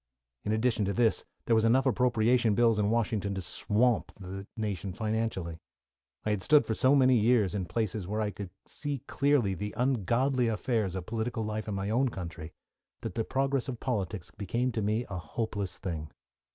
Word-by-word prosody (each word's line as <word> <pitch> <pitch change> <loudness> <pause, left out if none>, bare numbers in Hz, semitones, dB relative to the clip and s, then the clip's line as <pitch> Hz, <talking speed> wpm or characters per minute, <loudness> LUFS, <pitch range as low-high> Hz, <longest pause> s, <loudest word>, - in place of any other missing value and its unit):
In 105 - 0
addition 110 0 +2
to 100 - 0
this, 115 +2 +2 0.2
there 115 - +3
were 110 - +3
enough 125 +4 +4
appropriation 120 -3 +3
bills 115 -2 +4
in 105 0 +2
Washington 105 -3 0
to 95 - -3
swamp 115 +7 +1
the 95 +1 -7
nation 100 -3 -3
financially. 105 -6 -2 0.7
I 105 - +1
had 105 -2 0
stood 150 +5 +5
for 110 - -1
so 130 +5 +4
many 130 -2 +5
years 110 -3 +3
in 100 -3 -1
places 100 +1 -2
where 105 +2 -2
I 105 -1 0
could 100 -2 -7 0.2
see 145 -4 -5
clearly 140 -8 +2
the 105 +3 -5
ungodly 125 +1 +2
affairs 110 -3 0
of 90 -2 -4
political 115 +1 -2
life 110 0 -3
in 105 - -2
my 100 +2 -2
own 130 +3 +3
country, 85 -5 -7 0.5
that - - -4
the 115 - 0
progress 135 +2 0
of 125 -3 -4
politics 100 -7 -3
became 120 +5 -1
to 115 -1 -2
me 110 +4 0
a 95 - -5
hopeless 100 0 -3
thing. 80 -5 -4
110 Hz, 185 wpm, -30 LUFS, 100-120 Hz, 0.7 s, stood